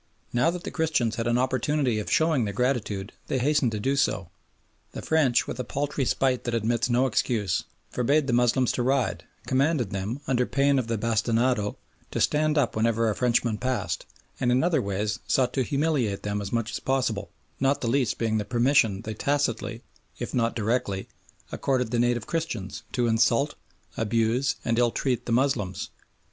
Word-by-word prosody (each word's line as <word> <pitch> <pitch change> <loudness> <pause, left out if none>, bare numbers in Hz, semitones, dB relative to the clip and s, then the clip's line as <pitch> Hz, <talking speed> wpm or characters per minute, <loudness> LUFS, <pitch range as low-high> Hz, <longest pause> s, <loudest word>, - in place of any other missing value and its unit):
Now 125 +5 +3
that 175 0 -4
the - - -5
Christians 155 -9 0
had 115 0 -1
an 120 0 +2
opportunity 130 -1 +1
of 105 - -5
showing 160 -5 +3
their 100 -2 -3
gratitude 110 -5 -1
they 135 - 0
hastened 135 -1 +2
to 105 - -2
do 135 +6 0
so. 95 -10 0 0.6
The - - -5
French, 150 -7 +3
with 120 - -6
a - - -1
paltry 140 +2 -2
spite 130 0 +1
that 120 -1 -1
admits 115 +2 0
no 125 +2 +3
excuse, 110 -7 0 0.3
forbade 140 +5 +2
the 130 - -1
Moslems 120 +1 +3
to - - -2
ride, 130 -1 0 0.2
commanded 135 - +1
them, 100 +7 -3
under 125 -1 +1
pain 140 0 +2
of 120 - -3
the 115 -1 -1
bastinado, 115 0 +1 0.3
to - - -3
stand 155 +1 +2
up 140 -5 +1
whenever 115 0 +2
a - - -3
Frenchman 120 -3 +1
passed, 130 0 -2 0.3
and 125 - +2
in 125 +1 +3
other 165 -5 +2
ways 105 +1 -2
sought 130 -2 +2
to 135 - +1
humiliate 140 -6 0
them 105 0 -2
as 100 - -5
much 115 -1 -1
as - - -3
possible, 115 -6 -1 0.3
not 135 +1 +1
the 120 - -1
least 125 -1 +1
being 110 -1 0
the - - -1
permission 120 -3 +2
they 110 - -4
tacitly, 115 -2 -1 0.3
if - - -5
not 115 -1 +1
directly, 110 -3 -1 0.4
accorded 125 -4 0
the 120 - +1
native 120 -1 +1
Christians 140 - -3
to 125 -1 +1
insult, 120 +5 +2 0.4
abuse, 115 +4 +1
and 115 0 +1
ill 120 -1 +4
treat 125 0 -2
the - - -2
Moslems. 115 -7 0
120 Hz, 180 wpm, -26 LUFS, 110-135 Hz, 0.6 s, ill